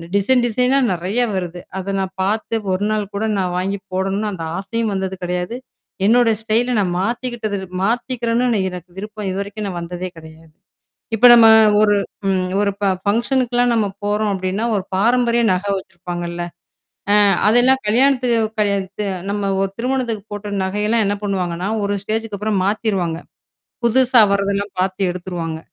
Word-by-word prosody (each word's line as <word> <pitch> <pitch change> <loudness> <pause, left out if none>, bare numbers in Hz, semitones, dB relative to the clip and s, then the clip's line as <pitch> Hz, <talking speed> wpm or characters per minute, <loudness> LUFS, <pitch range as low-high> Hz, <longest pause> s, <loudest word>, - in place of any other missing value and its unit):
Design 240 +5 +3
டிசைனா 250 +3 +2 0.2
நறைய 185 +7 -2
வருது. 180 -2 -4 0.2
அத 190 +1 -3
நான் 190 -1 -3
பார்த்து 215 +3 -1 0.2
ஒரு 185 +2 0
நாள் 210 -2 -2
கூட 215 - -1
நான் 180 -2 -1
வாங்கி 195 +2 -1
போடணும்னு 195 +3 -1
அந்த 170 -4 -6
ஆசையும் 220 +3 -2
வந்தது 190 0 -2
கிடையாது. 180 +4 -2 0.5
என்னோட 235 +2 +4
ஸ்டைல 225 +3 +1
நான் 180 -3 0
மாத்திக்கிட்டது 230 0 -2 0.3
மாத்திக்கிறேன்னு 235 0 0
எனக்கு 180 0 -9
விருப்பம். 210 +1 -6
இதுவரைக்கும் 200 +2 -4
நான் 175 -2 -4
வந்ததே 180 +2 -5
கிடையாது. 160 0 -14 0.6
இப்ப 245 +3 +7
நம்ம 230 -1 +8 0.3
ஒரு 205 -1 +4 0.4
ம் 190 -1 +1 0.2
ஒரு 205 -1 +1
ப - - +1 0.2
ஃபங்ஷனுக்கலாம் 245 +3 +1
நம்ம 220 -2 +2 0.2
போறோம் 210 0 0
அப்ப்டின்னா, 190 +4 -2
ஒரு 190 - -2
பாரம்பரிய 235 +3 +2
நகை 195 +2 -1
வச்சிருப்பாங்கல்ல. 175 -1 -6 0.7
ஆ - - +6 0.3
அதெல்லாம் 250 +4 +4
கல்யாணத்துக்கு 250 0 +3 0.2
கல்யா 200 -1 +2 0.2
த - - -1 0.3
நம்ம 200 -1 -1
ஒரு 195 - 0
திருமணத்துக்கு 240 -4 -2
போட்ட 205 0 -6
நகையெல்லாம் 210 +4 0
என்ன 205 - 0
பண்ணுவாங்கன்னா, 185 -2 -2 0.2
ஒரு 200 0 0
ஸ்டேஜ்க்கு 220 0 -3
அப்புறம் 210 -2 0
மாத்திருவாங்க. 195 -5 -1 0.7
புதுசா 250 0 +4
வர்றதெல்லாம் 200 0 0
பார்த்து 190 +1 0
எடுத்துருவாங்க. 175 -3 -5
205 Hz, 145 wpm, -19 LUFS, 185-230 Hz, 0.7 s, நம்ம